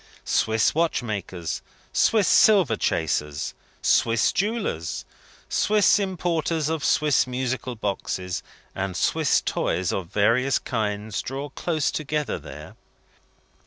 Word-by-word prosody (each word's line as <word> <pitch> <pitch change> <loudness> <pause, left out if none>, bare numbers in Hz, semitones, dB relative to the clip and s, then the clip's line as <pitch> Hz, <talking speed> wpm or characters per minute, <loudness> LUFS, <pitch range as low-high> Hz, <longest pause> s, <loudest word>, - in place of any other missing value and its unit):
Swiss 110 0 +2
watchmakers, 105 - -2 0.3
Swiss 215 -4 +3
silver 190 - +5
chasers, 75 -5 -1 0.3
Swiss 115 -1 +3
jewellers, 195 - -2 0.4
Swiss 210 0 +3
importers 170 -5 -1
of 160 -3 -2
Swiss 150 -3 +3
musical 125 0 -3
boxes 95 -3 -3 0.3
and 95 -2 -3
Swiss - - +2
toys 90 0 -1
of 95 -3 -3
various 120 +7 +2
kinds, 105 -2 -2
draw 135 +3 -5
close 155 +2 -1
together 150 -1 -2
there. - - -10
125 Hz, 100 wpm, -24 LUFS, 100-160 Hz, 0.4 s, silver